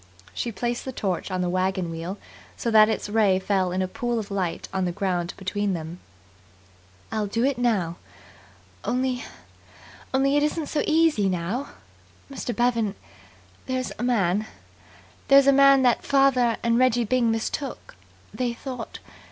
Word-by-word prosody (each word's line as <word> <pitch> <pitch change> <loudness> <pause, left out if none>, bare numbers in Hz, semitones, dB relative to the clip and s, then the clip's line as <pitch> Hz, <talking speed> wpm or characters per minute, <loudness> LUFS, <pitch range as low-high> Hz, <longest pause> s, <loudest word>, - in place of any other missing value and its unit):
She 235 - -3
placed 240 +2 -3
the 260 - -5
torch 195 -8 -3
on 185 -1 -2
the 180 - 0
wagon 185 -1 -1
wheel 165 +4 -5 0.4
so 235 - -2
that 215 0 +7
its 220 - -2
ray 205 -3 +3
fell 190 -1 0
in 185 +1 0
a - - -1
pool 240 +2 -2
of 210 -2 -4
light 185 -4 -2
on 190 -1 0
the 175 - -1
ground 175 -1 -2
between 200 +1 -2
them. 165 +1 -6 1.1
"I'll 215 -2 -1
do 230 +4 -1
it 270 -3 0
now. 195 -9 0 0.9
Only 255 0 -1 0.9
only 275 +2 +2
it - - +3
isn't 300 +1 0
so 300 - 0
easy 315 -11 +3
now. 185 +10 -2 0.6
Mr. 270 - -4
Bevan, 230 -4 +1 0.7
there's 255 -1 -2
a - - -2
man 215 -4 +1 0.8
there's 275 0 +7
a 275 - +6
man 275 -1 +6
that 245 -2 +3
father 270 -4 +3
and 235 0 +2
Reggie 245 -2 +3
Byng 240 +1 +2
mistook 225 +5 -3 0.4
they 245 -2 -1
thought 250 -1 -7
225 Hz, 155 wpm, -25 LUFS, 190-255 Hz, 1.1 s, that